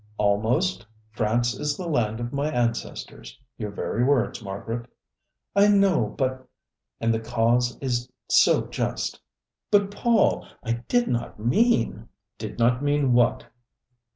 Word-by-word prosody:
"Almost 110 Hz, -, +1 dB, 0.3 s
'France 115 Hz, +2 st, 0 dB
is 150 Hz, +3 st, -2 dB
the 180 Hz, -, -5 dB
land 115 Hz, -8 st, 0 dB
of 120 Hz, +2 st, -5 dB
my 140 Hz, +2 st, 0 dB
ancestors' 120 Hz, -4 st, -3 dB, 0.2 s
your 105 Hz, -2 st, -3 dB
very 110 Hz, +3 st, -2 dB
words, 130 Hz, -3 st, +1 dB
Margaret." 115 Hz, +4 st, -5 dB, 0.7 s
"I 200 Hz, +1 st, +6 dB
know, 195 Hz, -, +3 dB
but 130 Hz, -1 st, -2 dB, 0.2 s
" 65 Hz, -2 st, -60 dB
"'And 115 Hz, 0 st, +1 dB
the 110 Hz, -, 0 dB
cause 120 Hz, +2 st, +1 dB
is 125 Hz, -2 st, -2 dB, 0.2 s
so -, -, +4 dB
just.'" -, -, -3 dB, 0.5 s
"But, 200 Hz, -1 st, +3 dB
Paul, 230 Hz, +1 st, +2 dB, 0.2 s
I 115 Hz, -1 st, -2 dB
did 245 Hz, -1 st, +2 dB
not 120 Hz, -3 st, -3 dB
mean 120 Hz, -, +1 dB
" 105 Hz, +4 st, -59 dB
"Did 110 Hz, -1 st, -6 dB
not 120 Hz, +2 st, +2 dB
mean 145 Hz, -3 st, +2 dB
what!" 120 Hz, -1 st, +2 dB
120 Hz, 140 wpm, -25 LUFS, 115-145 Hz, 0.7 s, I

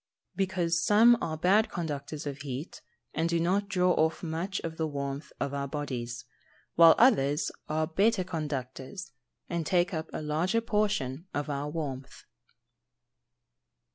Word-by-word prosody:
_ -, -, -44 dB
Because 180 Hz, -3 st, 0 dB
some 225 Hz, +5 st, +6 dB
are 160 Hz, -1 st, -2 dB
bad 195 Hz, +7 st, +3 dB
conductors 150 Hz, -3 st, -4 dB
of 145 Hz, -1 st, -5 dB
heat, 140 Hz, +3 st, -6 dB, 0.3 s
and 165 Hz, +2 st, 0 dB
do 170 Hz, 0 st, +1 dB
not 195 Hz, +4 st, +1 dB
draw 180 Hz, -2 st, +3 dB
off 160 Hz, 0 st, +1 dB
much 170 Hz, +4 st, -2 dB
of 165 Hz, -1 st, -5 dB
the 160 Hz, -, 0 dB
warmth 140 Hz, 0 st, -5 dB
of 140 Hz, -, -2 dB
our 140 Hz, 0 st, -2 dB
bodies; 125 Hz, -5 st, -4 dB, 0.5 s
while 165 Hz, -1 st, +8 dB
others 150 Hz, -, +3 dB, 0.2 s
are 155 Hz, +1 st, +1 dB
better 195 Hz, +5 st, +2 dB
conductors, 150 Hz, 0 st, -5 dB, 0.4 s
and 170 Hz, -1 st, -2 dB
take 175 Hz, +3 st, +1 dB
up 160 Hz, -1 st, -3 dB
a -, -, -5 dB
larger 165 Hz, +9 st, +1 dB
portion 210 Hz, -, -1 dB
of 145 Hz, 0 st, -2 dB
our 140 Hz, +1 st, -3 dB
warmth. 140 Hz, -4 st, -5 dB
160 Hz, 145 wpm, -29 LUFS, 145-185 Hz, 0.5 s, while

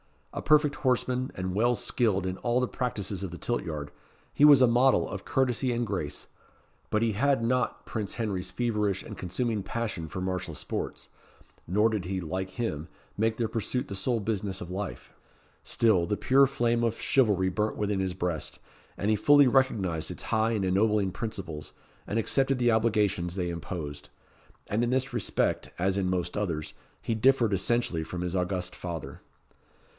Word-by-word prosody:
A -, -, -4 dB
perfect 150 Hz, -1 st, +4 dB
horseman, 130 Hz, -1 st, 0 dB
and 95 Hz, 0 st, -3 dB
well 120 Hz, +5 st, +3 dB
skilled 100 Hz, -8 st, +1 dB
in 95 Hz, 0 st, -2 dB
all 120 Hz, +1 st, +1 dB
the 125 Hz, -, +1 dB
practices 105 Hz, -7 st, -3 dB
of 95 Hz, -, -3 dB
the 85 Hz, -, -8 dB
tilt 120 Hz, -, -1 dB
yard 75 Hz, -4 st, -5 dB, 0.4 s
he 145 Hz, -, +5 dB
was 145 Hz, -3 st, +8 dB
a -, -, +8 dB
model 125 Hz, +3 st, +4 dB
of -, -, -6 dB
courtesy 130 Hz, -1 st, +1 dB
and 120 Hz, 0 st, 0 dB
grace; 90 Hz, -9 st, -4 dB, 0.6 s
but 110 Hz, +1 st, +1 dB
he 115 Hz, -, +2 dB
had 135 Hz, +4 st, +2 dB
not 125 Hz, +2 st, 0 dB
Prince 105 Hz, -3 st, -4 dB
Henry's 100 Hz, -6 st, -2 dB
feverish 105 Hz, -1 st, 0 dB
and -, -, -9 dB
consuming 105 Hz, +4 st, -2 dB
passion 105 Hz, -5 st, -3 dB
for 90 Hz, -, -6 dB
martial 90 Hz, -1 st, -3 dB
sports, -, -, -5 dB, 0.6 s
nor 105 Hz, +6 st, +3 dB
did 105 Hz, -5 st, -2 dB
he, 95 Hz, +1 st, -2 dB
like 95 Hz, +3 st, -4 dB
him, 85 Hz, -, -3 dB, 0.3 s
make 110 Hz, +1 st, +1 dB
their 115 Hz, -2 st, 0 dB
pursuit 115 Hz, +3 st, -2 dB
the -, -, -4 dB
sole 115 Hz, +5 st, 0 dB
business 100 Hz, -2 st, -2 dB
of 90 Hz, -, -7 dB
life. 100 Hz, +1 st, -5 dB, 0.5 s
Still, 100 Hz, -7 st, +2 dB
the 105 Hz, -, 0 dB
pure 135 Hz, +1 st, +5 dB
flame 120 Hz, -3 st, +1 dB
of 115 Hz, -1 st, 0 dB
chivalry 105 Hz, -8 st, +3 dB
burnt 105 Hz, +3 st, -1 dB
within 105 Hz, -1 st, 0 dB
his 95 Hz, -1 st, -1 dB
breast, 90 Hz, -3 st, -2 dB, 0.4 s
and 105 Hz, +2 st, +1 dB
he -, -, +4 dB
fully 145 Hz, +6 st, +6 dB
recognised 110 Hz, -11 st, +1 dB
its -, -, -6 dB
high 110 Hz, +1 st, +1 dB
and 100 Hz, -4 st, 0 dB
ennobling 100 Hz, +1 st, +2 dB
principles, 90 Hz, -8 st, -6 dB, 0.3 s
and 110 Hz, -, -1 dB
accepted 135 Hz, +4 st, +2 dB
the 120 Hz, -1 st, +3 dB
obligations 105 Hz, -6 st, +1 dB
they 90 Hz, -2 st, -1 dB
imposed. 80 Hz, -4 st, -6 dB, 0.6 s
And 110 Hz, +3 st, 0 dB
in 120 Hz, -, +1 dB
this 130 Hz, +1 st, 0 dB
respect, 120 Hz, -, 0 dB
as 95 Hz, +2 st, +1 dB
in 95 Hz, -2 st, 0 dB
most 90 Hz, -1 st, -1 dB
others, 85 Hz, -8 st, -2 dB, 0.3 s
he 115 Hz, -, -1 dB
differed 115 Hz, -1 st, +3 dB
essentially 95 Hz, -3 st, 0 dB
from 90 Hz, +2 st, -5 dB
his 90 Hz, +1 st, -2 dB
august 90 Hz, 0 st, -1 dB
father. 85 Hz, -4 st, -6 dB
105 Hz, 175 wpm, -28 LUFS, 90-120 Hz, 0.6 s, was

